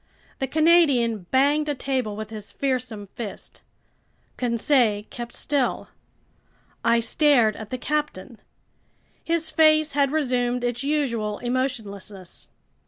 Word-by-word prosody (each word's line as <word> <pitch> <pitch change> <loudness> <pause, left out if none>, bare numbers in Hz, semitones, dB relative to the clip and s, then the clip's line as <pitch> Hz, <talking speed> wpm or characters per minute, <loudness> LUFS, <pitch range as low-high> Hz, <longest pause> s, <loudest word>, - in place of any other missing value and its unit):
The 265 - -1
Canadian 275 - +3
banged 290 +3 +2
a 290 - 0
table 255 -6 -2
with 215 +1 -7
his 215 -2 -7
fearsome 250 -6 -2
fist. 220 -4 -8 0.7
Conseil 235 -3 +2
kept 240 -3 -6
still. 280 -4 -1 0.9
I 235 - +4
stared 235 -3 +3
at 220 -1 -9
the 255 - -3
captain. 270 -6 -3 0.8
His 330 -1 -1
face 310 -1 +4
had 280 -1 +2
resumed 250 -5 0
its 245 0 -1
usual 235 -8 -1
emotionlessness. 215 -7 -4
250 Hz, 110 wpm, -24 LUFS, 225-290 Hz, 0.9 s, I